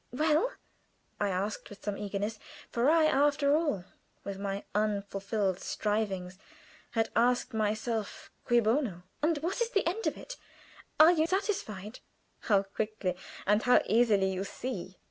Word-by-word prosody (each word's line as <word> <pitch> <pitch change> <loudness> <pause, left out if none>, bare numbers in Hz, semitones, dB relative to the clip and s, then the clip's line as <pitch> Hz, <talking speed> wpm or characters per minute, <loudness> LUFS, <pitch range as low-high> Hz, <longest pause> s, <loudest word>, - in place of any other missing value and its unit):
"Well?" 310 - +2 0.7
I 205 - +1
asked, 195 +3 -3
with 205 - -13
some 205 -1 -2
eagerness; 205 +1 -3 0.3
for 240 +4 +2
I, 320 0 +5
after 285 0 +3
all 295 - 0 0.4
my 195 0 -4
unfulfilled 200 -2 -1
strivings, 195 -4 -2 0.5
had 225 -1 +1
asked 245 +1 +2
myself 215 0 -2
Cui 240 -1 +4
bono? 220 - 0 0.2
"And 315 +1 +2
what 370 +8 -1
is 470 - +1
the 405 -6 +1
end 375 +7 -1
of - - -1
it? - - -9 0.6
Are 315 +2 +9
you 320 -2 +2
satisfied?" 255 - -2 0.4
"How 200 -3 +2
quickly 200 -2 -3 0.3
and 210 +2 +3
how 250 0 +5
easily 210 -4 +3
you 190 +1 -2
see!" 195 -4 -6
215 Hz, 140 wpm, -30 LUFS, 200-290 Hz, 0.7 s, Are